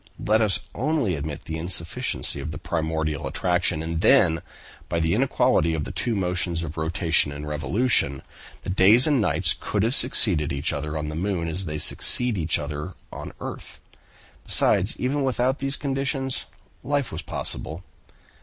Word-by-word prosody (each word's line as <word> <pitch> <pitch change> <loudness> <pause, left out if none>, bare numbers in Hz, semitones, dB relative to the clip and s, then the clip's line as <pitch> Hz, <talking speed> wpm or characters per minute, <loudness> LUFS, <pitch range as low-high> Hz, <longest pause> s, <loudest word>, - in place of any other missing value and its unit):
Let 110 +2 +1
us 105 -3 +2
only 135 - -1
admit 75 0 -5
the 80 0 -5
insufficiency 85 -4 -1
of 70 +3 -5
the 75 - -6
primordial 80 -2 -3
attraction; 90 -3 -1
and 80 0 -3
then 90 -12 +4 0.5
by 85 - -1
the 80 0 +1
inequality 100 - +2
of 75 - -3
the - - -6
two 120 - -1
motions 90 -3 -1
of 80 -1 -6
rotation 80 -1 +1
and 75 +1 -7
revolution, 75 - +1 0.4
the - - -4
days 100 +7 +5
and 145 -6 +2
nights 85 -3 +2
could 105 -1 -1
have 115 +3 +1
succeeded 95 - +5
each 70 +2 -2
other 75 +1 -4
on 75 0 -4
the 75 - -6
moon 90 -1 -2
as 90 +4 -3
they 75 -1 -4
succeed 125 +9 +4
each 85 -3 0
other 75 +3 -6 0.2
on - - -7
the - - -11
earth. - - -8 0.6
Besides, 95 +6 +2
even 140 +3 -1
without 130 0 0
these 135 0 -2
conditions, 135 -1 -2 0.4
life 145 -3 -1
was - - -5
possible." 80 +4 -4
85 Hz, 165 wpm, -24 LUFS, 80-120 Hz, 0.6 s, days